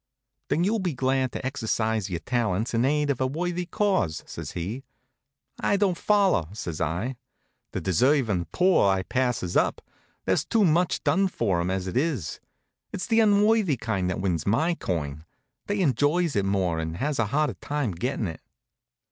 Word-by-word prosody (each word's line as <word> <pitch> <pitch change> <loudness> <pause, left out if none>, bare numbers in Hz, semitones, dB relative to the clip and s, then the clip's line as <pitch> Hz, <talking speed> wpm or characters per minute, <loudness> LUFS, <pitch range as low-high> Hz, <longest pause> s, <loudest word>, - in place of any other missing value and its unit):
"Then 170 - +2
you'll 215 +4 +1
be 180 -6 -2
glad 130 0 +1
to - - -5
exercise 110 -5 -1
your 85 -2 -3
talents 115 -1 -1
in 115 +2 +2
aid 150 +1 +2
of 130 - -3
a 130 - +2
worthy 175 +5 -2
cause," 190 - 0
says - - -7
he. 100 +10 -4 0.8
"It 200 - +3
don't 195 -4 +2
follow," 195 - +2
says 85 -7 -5
I. 90 - -2 0.5
"The - - -3
deservin' 105 - +2
poor 180 - +4
I 95 -1 +1
passes 125 -7 -1
up. - - +2 0.5
There's - - +2
too 220 -3 +2
much 175 +2 +2
done 195 +1 +3
for 100 - 0
'em, 85 - -1
as 95 0 -1
it 95 - -5
is. 130 - -1 0.5
It's 185 - -4
the 225 -1 +3
unworthy 210 - +4
kind 100 -6 -1
that 90 - -2
wins 90 -4 -1
my 155 +12 +2
coin. 75 - -3 0.4
They 205 -1 0
enjoys 155 +2 +2
it 100 -1 +1
more 95 -4 0
and 80 +1 -4
has 145 +5 -1
a 115 - +2
harder 150 +6 +1
time 145 -6 -2
gettin' 105 +5 -2
it." 80 - -7
125 Hz, 175 wpm, -26 LUFS, -, 0.8 s, poor